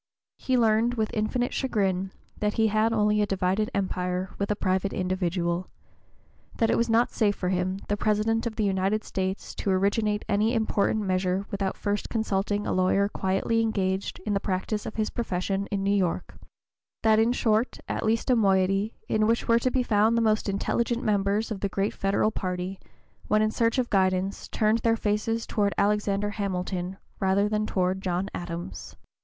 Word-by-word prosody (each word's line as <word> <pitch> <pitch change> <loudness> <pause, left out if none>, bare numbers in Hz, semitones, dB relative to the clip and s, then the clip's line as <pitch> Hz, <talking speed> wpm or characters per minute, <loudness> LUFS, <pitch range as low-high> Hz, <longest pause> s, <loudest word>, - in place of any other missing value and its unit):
He 260 -1 +1
learned 230 +1 +3
with 220 -2 -1
infinite 235 +3 -1
chagrin 195 -7 0 0.3
that 210 0 0
he 220 -1 +3
had 215 +2 +2
only 210 -1 +2
a 205 - +1
divided 195 +2 0
empire 180 -1 -2
with 200 - -1
a 210 - +1
private 190 0 0
individual; 180 -1 -1 0.9
that 225 - +2
it - - +3
was 235 0 +1
not 230 +2 +3
safe 205 -3 +1
for 180 - -2
him, 185 +1 0
the 205 - +1
President 215 +2 +1
of 220 - -5
the 220 - 0
United 195 +2 +1
States, 190 +1 -3
to - - -3
originate 210 +2 +1
any 215 +4 +2
important 220 -1 +1
measure 185 0 0
without 195 -2 -2
first 205 0 -2
consulting 205 -2 -1
a - - -1
lawyer 185 +2 +2
quietly 195 +4 0
(p. - - +4
027) 225 - +1
engaged 190 -2 -1
in 210 - 0
the 200 - +1
practice 200 +2 -2
of - - -6
his 215 -1 -1
profession 195 -2 -2
in 195 -1 -2
New 200 +1 +2
York; 180 -4 -1 0.7
that, 220 -1 +5
in 225 +2 +3
short, 225 -1 +1
at - - -2
least 225 +3 +1
a - - +5
moiety, 195 0 +2
in 215 0 +2
which 230 +1 +1
were 230 0 +4
to 255 - +1
be 255 0 +1
found 220 0 +3
the - - +3
most 215 -1 +1
intelligent 235 +4 -1
members, 205 +2 +1
of 205 - -3
the 200 - -1
great 195 +2 -1
Federal 200 +2 +1
party, 185 -1 -4 0.5
when 215 0 +3
in 215 - +1
search 230 +2 +1
of 250 -2 0
guidance, 190 0 +1
turned 215 +1 +1
their 230 0 +2
faces 220 +2 -1
toward 205 -2 0
Alexander 205 0 +1
Hamilton 185 -2 -3 0.2
rather 195 +1 +2
than 215 0 -1
toward 185 0 0
John 185 +1 -2
Adams. 170 - -6
205 Hz, 185 wpm, -26 LUFS, 190-220 Hz, 0.9 s, that